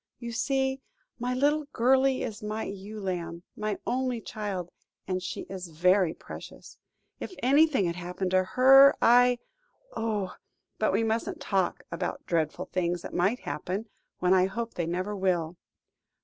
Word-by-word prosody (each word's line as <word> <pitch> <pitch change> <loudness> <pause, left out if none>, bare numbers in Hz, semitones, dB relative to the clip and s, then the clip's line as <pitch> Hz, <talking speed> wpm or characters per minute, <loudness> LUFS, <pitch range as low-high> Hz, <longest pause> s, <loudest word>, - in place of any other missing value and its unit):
You 235 0 -6
see, 265 +3 0 0.4
my 250 +1 -1
little 295 +3 +2
girlie 260 +2 +3
is 225 -2 -5
my 215 +1 -3
ewe 200 +2 -7
lamb 175 -3 -4
my 210 -1 -2
only 255 -1 -1
child 200 -5 -5 0.4
and 185 0 -1
she - - -5
is 190 -2 -7
very 180 +2 +3
precious. - - -11 0.4
If 370 - -7
anything 275 - +4
had 170 0 -2
happened 180 +1 -3
to 185 0 +4
her, 270 +6 +7
I 245 +1 +5 0.6
oh! 210 -4 -2 0.4
but - - +2
we - - +2
mustn't 225 +1 -1
talk 190 -3 -1
about 170 - -4
dreadful 165 +1 -1
things 175 -2 -1
that - - -7
might 195 +8 +1
happen, 185 +9 -4 0.3
when 180 +1 +3
I 185 0 +4
hope 230 +4 -4
they 170 -2 -2
never 185 +4 -2
will. 180 -4 0
205 Hz, 150 wpm, -28 LUFS, 180-245 Hz, 0.6 s, her